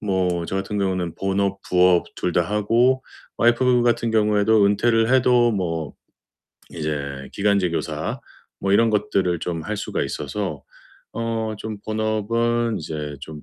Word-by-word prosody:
뭐 90 Hz, -4 st, 0 dB
저 95 Hz, -, -3 dB
같은 100 Hz, +2 st, -3 dB
경우는 95 Hz, -4 st, -1 dB
본업, 95 Hz, 0 st, -1 dB
부업 90 Hz, -1 st, +4 dB
둘 90 Hz, -, -1 dB
다 -, -, +3 dB
하고 115 Hz, +7 st, +2 dB, 0.4 s
와이프 120 Hz, +1 st, +3 dB
같은 120 Hz, -1 st, +1 dB
경우에도 105 Hz, -1 st, +3 dB
은퇴를 115 Hz, +3 st, +2 dB
해도 125 Hz, -2 st, +4 dB
뭐 80 Hz, -6 st, -2 dB, 0.8 s
이제 70 Hz, -4 st, -4 dB
기간제 100 Hz, -3 st, +1 dB
교사 -, -, -3 dB, 0.4 s
뭐 95 Hz, -, 0 dB
이런 115 Hz, +3 st, +5 dB
것들을 100 Hz, -5 st, 0 dB
좀 85 Hz, -2 st, -3 dB
할 105 Hz, +4 st, -4 dB
수가 -, -, -3 dB
있어서 75 Hz, +1 st, -4 dB, 0.5 s
어 115 Hz, -1 st, -2 dB
좀 110 Hz, 0 st, -5 dB
본업은 110 Hz, +1 st, 0 dB
이제 75 Hz, -1 st, -5 dB
좀 75 Hz, +1 st, -9 dB
100 Hz, 260 characters per minute, -22 LUFS, 90-115 Hz, 0.8 s, 이런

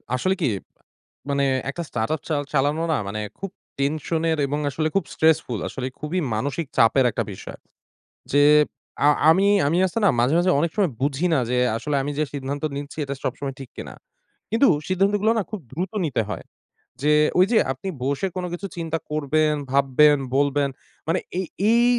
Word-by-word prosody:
আসলে 185 Hz, +9 st, +1 dB
কি? 145 Hz, -, +2 dB, 0.8 s
মানে 140 Hz, 0 st, +1 dB, 0.3 s
একটা 170 Hz, +5 st, -4 dB
স্টার্টআপ 120 Hz, +7 st, -2 dB
চাল 145 Hz, -2 st, 0 dB
চালানো 145 Hz, +3 st, +1 dB
না -, -, +1 dB
মানে 105 Hz, +2 st, -4 dB, 0.2 s
খুব 195 Hz, -1 st, -5 dB, 0.3 s
টেনশনের 160 Hz, +3 st, 0 dB
এবং 145 Hz, +2 st, -2 dB
আসলে 155 Hz, +3 st, -1 dB
খুব 195 Hz, -, +2 dB
স্ট্রেসফুল। 160 Hz, -8 st, +2 dB
আসলে 130 Hz, -, -5 dB
খুবই 155 Hz, +5 st, -2 dB, 0.2 s
মানসিক 145 Hz, +7 st, -2 dB
চাপের 125 Hz, +3 st, +5 dB
একটা -, -, -1 dB
বিষয়। -, -, -10 dB, 0.7 s
যে 145 Hz, 0 st, +5 dB, 0.6 s
আ -, -, +7 dB, 0.2 s
আমি, 190 Hz, +4 st, +3 dB, 0.2 s
আমি 165 Hz, +4 st, +1 dB
আছে 185 Hz, -, -7 dB
না -, -, +6 dB
মাঝে, 125 Hz, +6 st, +3 dB
মাঝে 180 Hz, +1 st, +3 dB
অনেক 165 Hz, +2 st, 0 dB
সময় 195 Hz, -7 st, +2 dB
বুঝি 140 Hz, +5 st, +1 dB
না 150 Hz, -, +3 dB
যে 125 Hz, -, +1 dB, 0.2 s
আসলে 150 Hz, +5 st, -2 dB
আমি 145 Hz, -, -2 dB
যে -, -, +3 dB
সিদ্ধান্ত 140 Hz, +1 st, -4 dB
নিচ্ছি 145 Hz, +1 st, -7 dB
এটা 140 Hz, 0 st, -4 dB
সবসময় 135 Hz, -2 st, -3 dB
ঠিক 135 Hz, -3 st, -9 dB
কিনা। -, -, -7 dB, 0.6 s
কিন্তু 235 Hz, +5 st, +4 dB, 0.2 s
সিদ্ধান্তগুলা 200 Hz, +3 st, +2 dB
না -, -, 0 dB
খুব 215 Hz, -, -4 dB
দ্রুত 175 Hz, +8 st, -3 dB
নিতে 135 Hz, -7 st, 0 dB
হয়। 95 Hz, -, -5 dB, 0.6 s
যে, 150 Hz, -, +3 dB, 0.3 s
ওইযে 210 Hz, +5 st, +5 dB
আপনি 160 Hz, +9 st, -7 dB, 0.2 s
বসে 140 Hz, +7 st, 0 dB
কোনো 180 Hz, -1 st, -2 dB
কিছু 190 Hz, +3 st, -5 dB
চিন্তা 165 Hz, -1 st, -2 dB
করবেন, 155 Hz, +1 st, +1 dB, 0.2 s
ভাববেন, 140 Hz, +2 st, +5 dB, 0.2 s
বলবেন। 140 Hz, 0 st, +2 dB, 0.4 s
মানে 165 Hz, +3 st, +2 dB, 0.2 s
এই 190 Hz, -, -1 dB, 0.2 s
এই 235 Hz, +1 st, +5 dB
150 Hz, 170 wpm, -23 LUFS, 140-175 Hz, 0.8 s, আ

